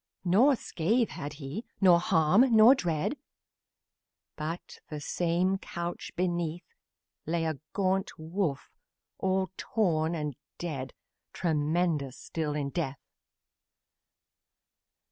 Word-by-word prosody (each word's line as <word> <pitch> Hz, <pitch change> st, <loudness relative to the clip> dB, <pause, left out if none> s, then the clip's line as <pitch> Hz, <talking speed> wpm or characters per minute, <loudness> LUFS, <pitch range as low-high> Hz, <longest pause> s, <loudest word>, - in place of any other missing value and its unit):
Nor 235 Hz, +11 st, +5 dB
scratch 225 Hz, +3 st, 0 dB
had 150 Hz, -3 st, -5 dB
he, 145 Hz, -, -6 dB, 0.2 s
nor 180 Hz, -3 st, +6 dB
harm, 195 Hz, +6 st, +4 dB
nor 220 Hz, +4 st, +9 dB
dread, 175 Hz, -, -1 dB, 1.2 s
But, 160 Hz, +3 st, -5 dB
the 150 Hz, -, -5 dB
same 180 Hz, +5 st, 0 dB
couch 170 Hz, -2 st, -5 dB
beneath, 175 Hz, -2 st, -1 dB, 0.6 s
Lay 165 Hz, 0 st, 0 dB
a 155 Hz, -4 st, -2 dB
great 190 Hz, -1 st, +1 dB
wolf, 160 Hz, -2 st, -2 dB, 0.5 s
all 190 Hz, 0 st, 0 dB
torn 170 Hz, -6 st, +1 dB
and 150 Hz, -4 st, -3 dB, 0.2 s
dead 140 Hz, -7 st, -5 dB, 0.4 s
Tremendous 155 Hz, -3 st, 0 dB
still 155 Hz, -3 st, -3 dB
in 140 Hz, -2 st, -2 dB
death. 140 Hz, -5 st, -2 dB
170 Hz, 100 wpm, -29 LUFS, 155-190 Hz, 1.2 s, nor